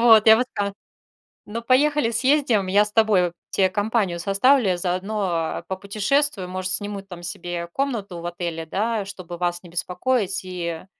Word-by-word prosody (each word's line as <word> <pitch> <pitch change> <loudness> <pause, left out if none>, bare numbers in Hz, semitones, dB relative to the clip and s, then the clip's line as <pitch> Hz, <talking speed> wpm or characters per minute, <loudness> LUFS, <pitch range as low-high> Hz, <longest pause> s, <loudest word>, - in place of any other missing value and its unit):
вот, 225 -2 +7
я 220 - +9
бы 245 - +2
сказала: 200 -1 -2 0.7
"Ну, 230 +2 -5
поехали, 275 0 +3
съездим. 255 -6 +2
Я 205 +2 +4
с 210 - -7
тобою, 200 -6 +3 0.2
те 190 -1 +2
компанию 205 -3 0
составлю, 205 +6 +3
я 180 - +1
заодно 180 -2 -2
попутешествую. 200 +4 0
Может, 185 0 -3
сниму 205 +1 -3
там 180 -3 -11
себе 175 0 -5
комнату 225 -10 -2
в - - -8
отеле, 170 -2 -4
да, 215 +3 -1
чтобы 180 -3 -8
вас 175 0 -1
не 175 - -12
беспокоить." 190 +4 -1
И, 170 -2 -5
195 Hz, 160 wpm, -23 LUFS, 180-225 Hz, 0.7 s, я